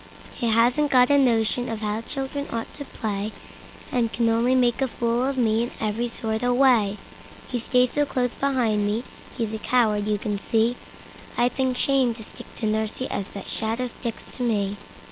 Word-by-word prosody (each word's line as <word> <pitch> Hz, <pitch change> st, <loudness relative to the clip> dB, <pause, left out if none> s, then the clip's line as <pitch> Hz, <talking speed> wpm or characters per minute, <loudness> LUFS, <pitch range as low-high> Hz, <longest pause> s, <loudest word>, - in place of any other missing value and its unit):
He 240 Hz, -, -2 dB
hasn't 245 Hz, +6 st, +3 dB
got 250 Hz, 0 st, +5 dB
a 285 Hz, -, +6 dB
notion 240 Hz, -1 st, +2 dB
of 225 Hz, -1 st, -4 dB
how 210 Hz, +1 st, -1 dB
children 275 Hz, +3 st, -4 dB
ought 230 Hz, -1 st, -4 dB
to 285 Hz, -, -7 dB
play, 210 Hz, -4 st, -3 dB, 0.6 s
And 235 Hz, -3 st, +1 dB
can 235 Hz, -1 st, +1 dB
only 235 Hz, +3 st, +3 dB
make 245 Hz, 0 st, +2 dB
a 265 Hz, -, +3 dB
fool 235 Hz, 0 st, 0 dB
of 275 Hz, 0 st, -1 dB
me 225 Hz, -2 st, +2 dB
in 240 Hz, -, -2 dB
every 220 Hz, +2 st, -1 dB
sort 220 Hz, -1 st, -3 dB
of 245 Hz, 0 st, +2 dB
way. 235 Hz, -6 st, +4 dB, 0.5 s
He 245 Hz, -, -1 dB
stays 250 Hz, +1 st, +2 dB
so 290 Hz, -, +3 dB
close 250 Hz, -2 st, 0 dB
beside 250 Hz, -7 st, +1 dB
me, 205 Hz, +3 st, 0 dB, 0.3 s
he's 225 Hz, -3 st, -2 dB
a 220 Hz, -, -3 dB
coward 215 Hz, -4 st, +2 dB
you 210 Hz, -1 st, +1 dB
can 205 Hz, 0 st, -3 dB
see; 225 Hz, +3 st, +1 dB, 0.6 s
I'd 245 Hz, +1 st, +3 dB
think 260 Hz, -2 st, 0 dB
shame 265 Hz, -4 st, +2 dB
to 220 Hz, -, -9 dB
stick -, -, -11 dB
to 225 Hz, -, -3 dB
nursie 220 Hz, +4 st, -1 dB
as 200 Hz, -, -3 dB
that 200 Hz, -, -7 dB
shadow 225 Hz, +3 st, -1 dB
sticks 235 Hz, -1 st, -6 dB
to -, -, -6 dB
me! 205 Hz, -4 st, 0 dB
235 Hz, 195 wpm, -24 LUFS, 220-250 Hz, 0.6 s, a